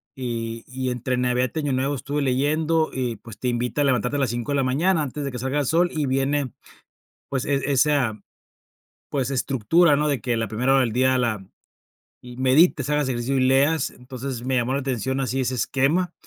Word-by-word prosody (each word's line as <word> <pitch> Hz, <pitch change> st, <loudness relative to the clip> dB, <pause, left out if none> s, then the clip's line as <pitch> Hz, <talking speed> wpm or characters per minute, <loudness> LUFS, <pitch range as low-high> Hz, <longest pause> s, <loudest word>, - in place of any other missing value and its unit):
Y 115 Hz, -3 st, -4 dB
y 130 Hz, 0 st, -3 dB
entre 125 Hz, +1 st, -2 dB
Navidad 125 Hz, 0 st, +1 dB
y -, -, 0 dB
Año 145 Hz, -3 st, -1 dB
Nuevo 135 Hz, +2 st, 0 dB
estuve 145 Hz, +2 st, -3 dB
leyendo, 155 Hz, +5 st, +1 dB
y, 125 Hz, -3 st, -2 dB
pues, 115 Hz, 0 st, -12 dB
te 125 Hz, -, -2 dB
invita 125 Hz, +4 st, -1 dB
a -, -, +4 dB
levantarte 125 Hz, +1 st, +1 dB
a -, -, -1 dB
las 130 Hz, -5 st, +1 dB
5 120 Hz, +3 st, -3 dB
de 140 Hz, -, +1 dB
la 135 Hz, -, +2 dB
mañana 155 Hz, +6 st, +2 dB
antes 145 Hz, +2 st, -5 dB
de 140 Hz, -, -3 dB
que 125 Hz, -, -6 dB
salga 130 Hz, +4 st, -1 dB
el 145 Hz, -, 0 dB
sol, 175 Hz, +2 st, +3 dB
y 150 Hz, -3 st, -1 dB
viene, 135 Hz, 0 st, 0 dB, 0.8 s
pues, 135 Hz, -2 st, -1 dB
e 140 Hz, -, +1 dB, 0.2 s
esa, 130 Hz, -6 st, +2 dB, 0.9 s
pues, 135 Hz, -2 st, -1 dB
estructura, 140 Hz, +5 st, +3 dB
¿no? 150 Hz, +1 st, +1 dB
De 140 Hz, -3 st, 0 dB
que 120 Hz, -2 st, -1 dB
la 115 Hz, -, -1 dB
primera 125 Hz, +5 st, +1 dB
hora 135 Hz, -, +5 dB
del 115 Hz, -4 st, +1 dB
día 130 Hz, +1 st, +2 dB
la 110 Hz, -5 st, -1 dB, 0.8 s
y 125 Hz, 0 st, -11 dB
medites, 135 Hz, +5 st, +3 dB
hagas 150 Hz, -2 st, +1 dB
ejercicio 125 Hz, +2 st, -1 dB
y 130 Hz, -, +2 dB
leas. 140 Hz, +5 st, +3 dB
Entonces, 125 Hz, -1 st, -7 dB
me 130 Hz, 0 st, 0 dB
llamó 120 Hz, +2 st, 0 dB
la 140 Hz, -, 0 dB
atención 130 Hz, 0 st, -2 dB
así 130 Hz, 0 st, -1 dB
ese 130 Hz, 0 st, -1 dB
esquema. 140 Hz, +9 st, +1 dB
130 Hz, 210 wpm, -23 LUFS, 125-145 Hz, 0.9 s, hora